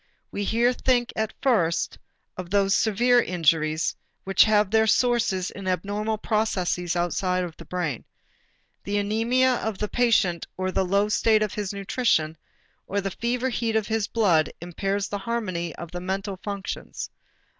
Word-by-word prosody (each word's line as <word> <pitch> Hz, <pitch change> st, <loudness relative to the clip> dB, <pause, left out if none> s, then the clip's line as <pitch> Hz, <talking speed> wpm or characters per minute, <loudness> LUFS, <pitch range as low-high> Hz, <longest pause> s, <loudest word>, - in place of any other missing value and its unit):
We 205 Hz, -, -3 dB
here 235 Hz, +4 st, +2 dB
think 245 Hz, -1 st, +1 dB
at 220 Hz, 0 st, -1 dB
first 175 Hz, -11 st, +1 dB, 0.4 s
of 180 Hz, -1 st, -7 dB
those 195 Hz, 0 st, +2 dB
severe 240 Hz, +3 st, +3 dB
injuries 160 Hz, -4 st, +1 dB, 0.3 s
which 195 Hz, 0 st, +5 dB
have 210 Hz, -2 st, +3 dB
their 220 Hz, 0 st, +4 dB
sources 225 Hz, -6 st, +2 dB
in 195 Hz, -1 st, -8 dB
abnormal 205 Hz, +4 st, -1 dB
processes 185 Hz, -5 st, -1 dB
outside 180 Hz, +1 st, 0 dB
of 170 Hz, -3 st, -6 dB
the -, -, -11 dB
brain. 170 Hz, -9 st, -3 dB, 0.8 s
The 200 Hz, -, -3 dB
anæmia 230 Hz, +5 st, +2 dB
of 220 Hz, -3 st, -3 dB
the 210 Hz, -, -2 dB
patient 220 Hz, -8 st, +2 dB
or 185 Hz, 0 st, -1 dB
the 190 Hz, -, +1 dB
low 200 Hz, +3 st, +2 dB
state 215 Hz, 0 st, +3 dB
of 210 Hz, -, -3 dB
his 205 Hz, -2 st, -3 dB
nutrition 195 Hz, -5 st, 0 dB, 0.5 s
or 200 Hz, -, -1 dB
the 195 Hz, 0 st, -3 dB
fever 245 Hz, +5 st, -1 dB
heat 230 Hz, -2 st, -1 dB
of 220 Hz, -2 st, +2 dB
his 220 Hz, -1 st, -1 dB
blood 180 Hz, -9 st, +2 dB
impairs 195 Hz, +4 st, -2 dB
the 205 Hz, -, -4 dB
harmony 190 Hz, -7 st, -3 dB
of 170 Hz, -1 st, -8 dB
the 175 Hz, 0 st, -5 dB
mental 195 Hz, +1 st, -3 dB
functions. 200 Hz, -1 st, -5 dB
200 Hz, 155 wpm, -25 LUFS, 180-220 Hz, 0.8 s, which